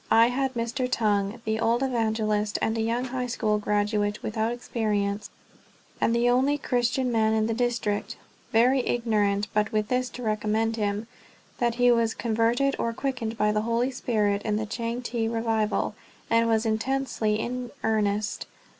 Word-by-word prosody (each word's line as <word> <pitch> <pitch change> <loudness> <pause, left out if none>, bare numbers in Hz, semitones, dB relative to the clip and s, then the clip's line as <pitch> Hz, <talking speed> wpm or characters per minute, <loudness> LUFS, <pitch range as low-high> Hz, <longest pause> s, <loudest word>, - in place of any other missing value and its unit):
I 230 +1 +6
had 265 +1 -1
Mr. 240 +2 -1
Tung, 210 -1 0
the 220 0 0
old 235 +3 +2
evangelist, 220 -4 0
and 220 - 0
a 225 - 0
young 230 +3 0
high 250 0 -3
school 215 -3 0
graduate 205 0 0
without 220 +1 -1
experience, 210 -4 -2 0.7
and 230 - +3
the 235 +1 +2
only 260 +4 +3
Christian 250 -1 0
man 220 -1 +2
in 215 0 +2
the 225 - 0
district, 235 -3 -1 0.3
very 250 +4 +4
ignorant 210 -5 +1
but 210 0 +1
with 215 0 0
this 255 0 0
to 250 - -7
recommend 215 +1 0
him, 210 0 -1 0.5
that 235 -1 +1
he 245 0 +4
was 230 -2 +2
converted 235 +4 +1
or 230 - -1
quickened 235 -3 -3
by 210 -1 +2
the 210 0 +1
Holy 235 +3 0
Spirit 210 -5 0
in 210 -1 -1
the 215 +1 -1
Changte 230 +1 -2
revival, 225 -2 0 0.4
and 230 0 +4
was 225 0 +2
intensely 225 -1 0
in 245 +1 -3
earnest. 210 -1 0
225 Hz, 160 wpm, -26 LUFS, 215-245 Hz, 0.7 s, I